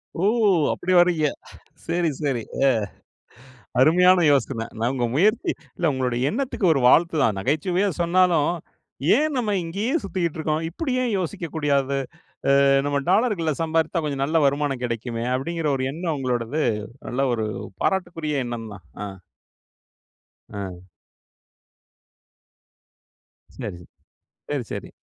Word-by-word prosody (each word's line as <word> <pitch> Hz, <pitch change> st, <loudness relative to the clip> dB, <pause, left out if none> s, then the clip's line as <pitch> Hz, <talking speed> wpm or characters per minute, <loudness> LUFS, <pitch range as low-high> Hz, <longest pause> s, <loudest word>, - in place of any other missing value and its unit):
ஓ! 175 Hz, -, 0 dB, 0.5 s
அப்டி 185 Hz, -, -1 dB
வரீங்க. 170 Hz, -4 st, +3 dB, 0.6 s
சரி, 170 Hz, 0 st, +1 dB
சரி. 135 Hz, -5 st, 0 dB, 0.2 s
அ. -, -, +6 dB, 1.1 s
அருமையான 180 Hz, +5 st, +5 dB
யோசன. 125 Hz, -4 st, 0 dB
நான் 120 Hz, +2 st, +1 dB
உங்க 125 Hz, -2 st, 0 dB
முயற்சி 215 Hz, -, +3 dB, 0.3 s
இல்ல 170 Hz, -2 st, +2 dB
உங்களுடைய 130 Hz, +1 st, 0 dB
எண்ணத்துக்கு 260 Hz, -4 st, -2 dB
ஒரு 140 Hz, -, +1 dB
வாழ்த்து 165 Hz, +6 st, +4 dB
தான். 110 Hz, -4 st, +2 dB
நகைச்சுவையா 175 Hz, -, +1 dB
சொன்னாலும், 170 Hz, -3 st, +3 dB, 0.7 s
"ஏன் 305 Hz, 0 st, 0 dB
நம்ம 215 Hz, -5 st, 0 dB
இங்கேயே 200 Hz, -, -2 dB
சுத்திக்ட்ருக்கோம்! 160 Hz, -3 st, -2 dB
இப்படி 260 Hz, -, -3 dB
ஏன் 240 Hz, -3 st, -1 dB
யோசிக்கக்கூடாது, 150 Hz, -6 st, -1 dB, 0.7 s
அ -, -, +4 dB, 0.2 s
நம்ம 145 Hz, 0 st, 0 dB
டாலர்கள்ல 190 Hz, -7 st, +2 dB
சம்பாரித்தா 165 Hz, +1 st, 0 dB
கொஞ்சம் 140 Hz, -2 st, -1 dB
நல்ல 160 Hz, +4 st, +2 dB
வருமானம் 140 Hz, -2 st, 0 dB
கெடைக்குமே!" 115 Hz, 0 st, -3 dB
அப்டிங்குற 155 Hz, +4 st, -1 dB
ஒரு 130 Hz, -, -2 dB
எண்ணம் 165 Hz, +1 st, -2 dB
உங்களோடது, 125 Hz, +3 st, -1 dB, 0.5 s
நல்ல 135 Hz, +3 st, 0 dB
ஒரு 110 Hz, -2 st, -2 dB, 0.4 s
பாராட்டுக்குரிய 165 Hz, -7 st, -1 dB
எண்ணந்தான். 115 Hz, -5 st, -7 dB, 0.2 s
ஆ, -, -, -2 dB, 1.5 s
ஆ. 95 Hz, -3 st, -7 dB, 2.7 s
சரி, 90 Hz, -, -6 dB
சரி. 85 Hz, -, -15 dB, 0.6 s
சரி, 145 Hz, -4 st, -1 dB
சரி. -, -, -6 dB
155 Hz, 115 wpm, -23 LUFS, 130-175 Hz, 2.7 s, அ